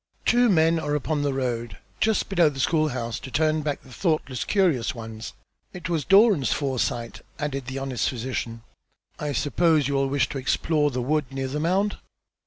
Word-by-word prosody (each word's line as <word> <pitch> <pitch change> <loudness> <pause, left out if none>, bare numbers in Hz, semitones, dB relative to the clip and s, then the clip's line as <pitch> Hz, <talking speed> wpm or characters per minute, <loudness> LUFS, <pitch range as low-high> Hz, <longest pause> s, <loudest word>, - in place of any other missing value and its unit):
Two 245 0 +4
men 165 -2 +4
are 150 -2 -1
upon 150 +1 -1
the 145 -1 0
road 120 -5 -3 0.2
just 220 -1 +1
below 175 -5 +4
the 135 -2 -8
school 155 +2 +2
house 120 -3 -4
to - - -9
turn 155 +3 +1
back 150 -1 -3
the 130 - -14
thoughtless 155 -6 -1
curious 160 - +1
ones. 110 -1 -7 0.4
It 180 -2 -6
was 160 -5 -1
Doran's 195 - +5
foresight," 125 -4 -2 0.2
added 140 -4 -3
the 130 +1 -4
honest 135 -3 -1
physician. 115 -2 -4 0.6
"I 150 -1 -2
suppose 150 +1 +2
you 140 - -1
will 135 0 +1
wish 140 -2 +1
to 135 - -4
explore 150 +3 +1
the 125 -2 -3
wood 150 +3 +1
near 135 0 -3
the 145 +3 -3
mound?" 190 +6 +1
145 Hz, 185 wpm, -25 LUFS, 130-160 Hz, 0.6 s, Doran's